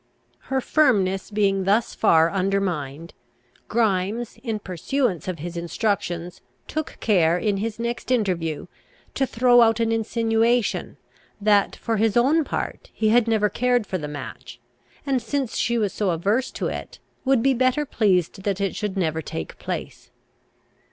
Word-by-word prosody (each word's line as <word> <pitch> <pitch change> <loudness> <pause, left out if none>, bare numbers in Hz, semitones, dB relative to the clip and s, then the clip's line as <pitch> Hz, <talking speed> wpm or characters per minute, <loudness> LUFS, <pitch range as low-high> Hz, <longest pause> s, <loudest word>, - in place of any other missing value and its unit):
Her 265 -1 +1
firmness 200 -11 +2
being 195 -2 +1
thus 210 +4 +2
far 165 -5 +4
undermined, 180 -6 -2 0.5
Grimes, 215 +1 0
in 225 -4 -2
pursuance 195 - -2
of 185 -2 -3
his 170 +3 -6
instructions, 175 -1 -2 0.3
took 310 0 -4
care, 175 -6 +3
in 205 +1 0
his 215 +2 -3
next 235 +2 -4
interview, 180 - 0 0.5
to 270 - 0
throw 245 +1 +5
out 225 -1 +4
an 225 -1 +1
insinuation 225 +1 +1 0.4
that, 205 -1 +3
for 225 -2 -2
his 220 +1 +2
own 290 +7 +4
part, - - -4
he 215 - 0
had 235 +1 +4
never 220 -2 +3
cared 245 +1 +1
for 185 -2 -3
the 150 - -5
match, 130 -4 -8 0.5
and 270 -3 +1
since 270 -1 -2
she 235 +1 +1
was 210 -4 0
so 205 -3 0
averse 200 +10 0
to - - -5
it, - - -5 0.3
would 265 -3 +2
be 270 0 +4
better 255 +4 +1
pleased 195 - +1
that 195 -1 -1
it 195 -1 -1
should 205 -2 -3
never 160 -3 0
take 80 - -6
place. - - -6
210 Hz, 150 wpm, -23 LUFS, 185-235 Hz, 0.5 s, throw